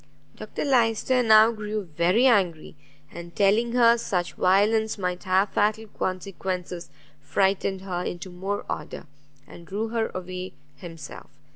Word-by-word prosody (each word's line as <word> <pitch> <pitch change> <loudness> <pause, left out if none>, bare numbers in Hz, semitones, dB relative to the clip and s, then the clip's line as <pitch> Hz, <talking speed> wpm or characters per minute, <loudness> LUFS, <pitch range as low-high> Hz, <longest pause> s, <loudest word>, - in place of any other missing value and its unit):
Dr - - -5
Lyster 250 -1 +2
now 220 -1 +6
grew 210 -1 -4
very 175 - +1
angry, 185 -11 +2 0.4
and 170 0 -10
telling 215 +4 +2
her 235 -1 +5
such 180 -6 -2
violence 215 +4 +2
might 180 -1 -3
have 190 +2 +2
fatal 215 +1 +1
consequences, 185 -2 -4 0.3
frightened 190 +5 0
her 180 -2 -4
into 180 +1 -5
more 195 +3 -4
order, - - -6 0.4
and 170 - -14
drew 215 +3 -3
her 225 -1 -1
away 185 0 -6 0.2
himself. 165 -3 -10
195 Hz, 130 wpm, -25 LUFS, 180-220 Hz, 0.4 s, now